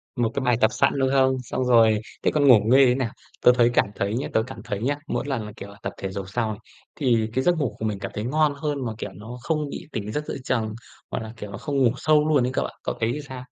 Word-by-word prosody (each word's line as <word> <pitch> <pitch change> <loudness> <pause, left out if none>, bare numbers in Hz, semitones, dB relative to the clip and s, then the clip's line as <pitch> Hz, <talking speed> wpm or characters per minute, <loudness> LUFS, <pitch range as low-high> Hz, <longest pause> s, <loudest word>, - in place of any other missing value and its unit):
Một 120 -2 0
cái 140 - -1
bài 125 -2 +3
tập 110 - +5
sẵn, - - +2
đúng 130 -1 +2
không? 130 -1 +3
Xong 130 +2 -2
rồi 115 -3 +5 0.2
thế - - +3
còn 145 -2 +3
ngủ 125 -5 +9
nghê 135 +4 +6
thế 125 0 +3
nào, 130 -4 -1 0.3
tớ 125 - +7
thấy 120 -1 +5
cảm - - +4
thấy 100 +1 -1
nhá 130 - -2
tớ 110 - +3
cảm 130 - -9
thấy 100 0 -4
nhá, 140 +4 +1
mỗi - - -2
lần 130 -6 -2
là, 105 - -8
kiểu 100 - -8
là, 100 - -14
tập - - -3
thể 95 - -4
dục 95 -1 -6
xong 115 +1 -1
này, 105 0 -5 0.4
thì 115 -6 +1
cái 130 - +1
giấc 175 +2 +3
ngủ 140 -7 -1
của 110 - -3
mình 105 -2 -2
cảm - - -5
thấy 105 - -3
ngon 150 +3 +2
hơn 145 -2 -3
mà, 115 - -3
kiểu, 105 - -5
nó 110 +5 -9
không 150 +2 -1
bị - - -7
tỉnh 105 -1 -4
giấc 150 +5 -3
giữa - - -4
chừng 115 -5 -1 0.4
hoặc - - -2
là, 110 - -8
kiểu, 105 -2 -7
nó 100 - -6
không 145 +5 -3
ngủ 120 - +5
sâu 155 +2 +3
luôn 140 -5 +3
ấy 125 - -1
cậu - - 0
ạ, - - -6
cậu - - -2
thấy 115 +2 +1
làm 150 - -4
sao? 130 -3 -8
125 Hz, 300 wpm, -24 LUFS, 110-140 Hz, 0.4 s, ngủ